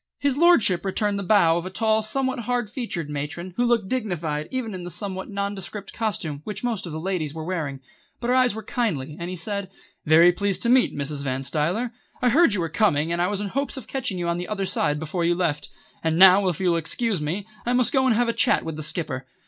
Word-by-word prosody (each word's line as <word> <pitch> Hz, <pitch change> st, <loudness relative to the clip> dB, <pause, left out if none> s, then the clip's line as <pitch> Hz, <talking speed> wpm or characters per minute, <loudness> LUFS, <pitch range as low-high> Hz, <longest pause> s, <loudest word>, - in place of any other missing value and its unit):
His 280 Hz, -2 st, 0 dB
lordship 270 Hz, -, +4 dB
returned 200 Hz, +1 st, -1 dB
the -, -, -3 dB
bow 175 Hz, -5 st, +4 dB
of 170 Hz, -, -4 dB
a -, -, -4 dB
tall, 220 Hz, +2 st, +1 dB
somewhat 260 Hz, +4 st, -1 dB
hard 240 Hz, -2 st, -2 dB
featured 225 Hz, -, -4 dB
matron 150 Hz, +5 st, -5 dB
who 245 Hz, -, +1 dB
looked 235 Hz, -5 st, +2 dB
dignified 170 Hz, -11 st, -2 dB
even 250 Hz, -5 st, -3 dB
in 185 Hz, -1 st, -6 dB
the 175 Hz, -, -6 dB
somewhat 190 Hz, +1 st, -5 dB
nondescript 200 Hz, 0 st, -4 dB
costume 170 Hz, -10 st, -2 dB
which 210 Hz, +6 st, -6 dB
most 230 Hz, -7 st, -2 dB
of -, -, -6 dB
the 155 Hz, -, -4 dB
ladies 165 Hz, -4 st, -2 dB
were 160 Hz, -, -5 dB
wearing. 155 Hz, -7 st, -3 dB, 0.4 s
But 235 Hz, -, -3 dB
her 250 Hz, -, +3 dB
eyes 255 Hz, -4 st, +3 dB
were 220 Hz, -, -6 dB
kindly, 190 Hz, -, -2 dB
and 170 Hz, +1 st, -4 dB
he 185 Hz, -, -4 dB
said: 200 Hz, +2 st, -3 dB, 0.4 s
"Very 165 Hz, +3 st, +7 dB
pleased 200 Hz, +1 st, -1 dB
to 235 Hz, -, +2 dB
meet, 255 Hz, 0 st, +4 dB
Mrs. 140 Hz, 0 st, -3 dB
Van 135 Hz, -1 st, -2 dB
Stuyler. 170 Hz, -, -1 dB, 0.3 s
I 250 Hz, -, +3 dB
heard 280 Hz, -3 st, +4 dB
you 185 Hz, -, -1 dB
were 165 Hz, -, -1 dB
coming, 160 Hz, -2 st, +1 dB
and 170 Hz, -, 0 dB
I 175 Hz, -, +2 dB
was 205 Hz, +1 st, -2 dB
in 205 Hz, -, -3 dB
hopes 275 Hz, +5 st, -2 dB
of 260 Hz, -, -7 dB
catching 240 Hz, -8 st, -2 dB
you 175 Hz, -1 st, -2 dB
on 170 Hz, 0 st, 0 dB
the 175 Hz, 0 st, -4 dB
other 205 Hz, -2 st, -2 dB
side 165 Hz, -6 st, +1 dB
before 160 Hz, +3 st, -3 dB
you 170 Hz, +1 st, +2 dB
left. 155 Hz, -5 st, -1 dB, 0.3 s
And 160 Hz, 0 st, +1 dB
now, 190 Hz, +1 st, +7 dB
if 175 Hz, -4 st, -1 dB
you 185 Hz, -2 st, +2 dB
will 170 Hz, -, +2 dB
excuse 190 Hz, +3 st, -1 dB
me, 170 Hz, +7 st, -3 dB, 0.2 s
I 245 Hz, -, +2 dB
must 250 Hz, +2 st, +2 dB
go 265 Hz, -2 st, +3 dB
and 235 Hz, -, +3 dB
have 240 Hz, +2 st, +2 dB
a 230 Hz, -, +1 dB
chat -, -, +2 dB
with 160 Hz, -2 st, -5 dB
the -, -, -4 dB
Skipper." 145 Hz, -5 st, -2 dB
190 Hz, 245 wpm, -24 LUFS, 165-225 Hz, 0.4 s, Very